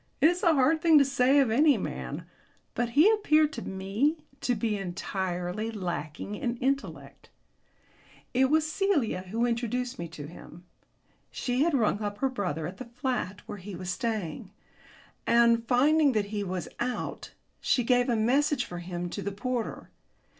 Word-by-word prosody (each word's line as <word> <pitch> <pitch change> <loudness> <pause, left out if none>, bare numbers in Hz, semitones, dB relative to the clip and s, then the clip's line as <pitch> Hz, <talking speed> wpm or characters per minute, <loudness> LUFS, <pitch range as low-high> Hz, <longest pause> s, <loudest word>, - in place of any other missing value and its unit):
It 315 - +6
is 355 +1 -4
a 335 -2 +4
hard 290 +4 +3
thing 330 -2 +6
to 280 - +6
say 265 0 +3
of 265 -5 +3
any 290 +4 +5
man, - - -5 0.5
but 240 -1 -1
he 315 +7 +8
appeared 310 -8 +3
to - - -5
me 200 +11 -1 0.2
to 245 - 0
be 220 0 -1
entirely 185 +1 -3
lacking 180 -3 -4
in 235 +3 -2
intellect. 275 +3 -3 1.0
It 260 +1 +3
was 310 +1 +3
Celia 310 - 0
who 230 +4 0
introduced 245 0 -2
me 170 - -4
to 145 -2 -9
him. 170 +2 -12 0.6
She 250 +1 -1
had 325 0 +3
rung 220 -4 +1
up 205 -1 -3
her 270 +4 +1
brother 180 - -3
at 185 +3 -6
the 255 - -7
flat 235 -5 -3
where 205 - -7
he 190 +1 -8
was 180 0 -4
staying, 215 -6 -3 0.8
and, 235 -1 +4
finding 285 +3 +4
that 210 -2 +1
he 205 -1 -1
was 185 -2 -4
out, 245 +1 -4 0.3
she 250 - +1
gave 245 +1 +2
a 240 - +2
message 255 +4 +2
for 175 - -7
him 175 0 -4
to - - -4
the 200 - -3
porter. 235 +4 -4
235 Hz, 170 wpm, -28 LUFS, 195-275 Hz, 1.0 s, he